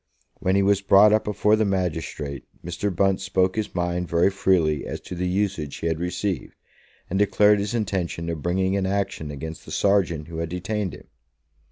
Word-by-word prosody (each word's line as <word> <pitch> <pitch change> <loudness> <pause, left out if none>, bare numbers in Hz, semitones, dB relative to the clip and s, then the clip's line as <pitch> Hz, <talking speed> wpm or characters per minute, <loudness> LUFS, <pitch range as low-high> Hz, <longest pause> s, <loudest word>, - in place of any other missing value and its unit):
When 95 +1 +1
he 100 - +3
was 100 0 +3
brought 100 +2 +6
up 110 - +2
before 105 +1 +2
the 110 - +1
magistrate, 80 - -3 0.2
Mr. 90 +4 -2
Bunce 95 +1 +1
spoke 95 0 +1
his 110 -3 -3
mind 90 0 -1
very 85 +3 +3
freely 85 -7 +2
as - - -4
to - - -8
the 90 +1 -2
usage 90 -6 -1
he - - -6
had 80 -1 0
received, 90 +1 -3 0.5
and 95 - -1
declared 105 +1 +4
his 100 +3 -2
intention 95 -6 -2
of 85 -3 -3
bringing 95 +3 0
an 95 -1 0
action 100 -5 -2
against 80 +3 -7
the - - -13
sergeant 90 -6 +1
who 80 -1 -6
had 85 -1 -2
detained 95 +1 -3
him. - - -14
95 Hz, 190 wpm, -24 LUFS, 85-100 Hz, 0.5 s, brought